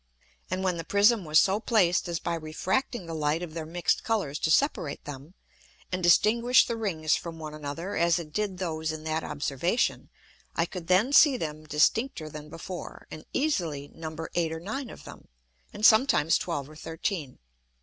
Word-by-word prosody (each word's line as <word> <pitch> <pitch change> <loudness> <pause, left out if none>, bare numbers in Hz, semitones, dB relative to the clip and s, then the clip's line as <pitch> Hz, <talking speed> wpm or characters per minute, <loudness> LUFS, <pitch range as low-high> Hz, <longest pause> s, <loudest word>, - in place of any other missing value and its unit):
And 185 +1 -2
when 185 -2 0
the 165 - -4
Prism 205 +1 +3
was 155 0 +3
so 195 +5 +4
placed 195 -8 +2
as 170 -1 -2
by 170 - -2
refracting 180 +8 -2
the 165 - -6
Light 155 +2 0
of 165 -3 -7
their 160 -1 -5
mix'd 175 +2 0
Colours 195 -11 -1
to - - 0
separate 165 - +1
them, 145 +5 -9 0.6
and 185 0 -2
distinguish 230 +8 +5
the 235 - -2
Rings 165 -9 0
from 165 -1 -6
one 155 -1 -7
another, 155 +5 -5
as 170 0 +3
it 155 -3 -7
did 210 -3 -2
those 160 -3 -2
in 155 0 -7
that 160 0 -2
Observation, 150 - -1 0.5
I 165 - +2
could 175 -1 -8
then 195 +10 +3
see 285 -3 +7
them 155 -4 -5
distincter 155 - +1
than 150 0 -9
before, 170 +2 -8
and 155 - -9
easily 165 - -1
number 160 0 -7
eight 165 -2 0
or 160 - -4
nine 225 +9 -5
of - - -11
them, - - -12 0.4
and 215 - -1
sometimes 220 - +5
twelve 145 -6 -3
or 155 - -14
thirteen. 160 -2 -4
170 Hz, 180 wpm, -28 LUFS, 155-200 Hz, 0.6 s, see